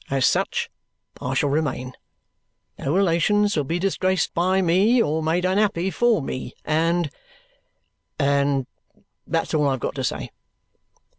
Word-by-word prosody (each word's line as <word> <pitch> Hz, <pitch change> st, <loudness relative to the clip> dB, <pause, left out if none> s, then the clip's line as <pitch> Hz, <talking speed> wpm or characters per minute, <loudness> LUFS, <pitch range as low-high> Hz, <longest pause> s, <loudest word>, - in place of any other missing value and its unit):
As 135 Hz, -1 st, +1 dB
such -, -, 0 dB, 0.5 s
I 130 Hz, +1 st, -2 dB
shall 145 Hz, +2 st, +1 dB
remain. 140 Hz, -4 st, -2 dB, 0.9 s
No 135 Hz, -, -2 dB
relations 200 Hz, +3 st, +2 dB
will 150 Hz, -3 st, 0 dB
be 165 Hz, +5 st, -1 dB
disgraced 185 Hz, -1 st, 0 dB
by 185 Hz, +3 st, +2 dB
me 190 Hz, +7 st, +3 dB
or 160 Hz, -7 st, +1 dB
made 165 Hz, +3 st, 0 dB
unhappy 190 Hz, -1 st, +1 dB
for 225 Hz, -, +2 dB
me, 130 Hz, -, -5 dB
and 165 Hz, 0 st, +1 dB, 1.1 s
and 140 Hz, -2 st, +1 dB, 0.6 s
that's 165 Hz, +1 st, -1 dB
all 150 Hz, -2 st, +2 dB
I've 135 Hz, -1 st, -1 dB
got -, -, -3 dB
to -, -, -4 dB
say." -, -, -3 dB
165 Hz, 135 wpm, -23 LUFS, 145-190 Hz, 1.1 s, me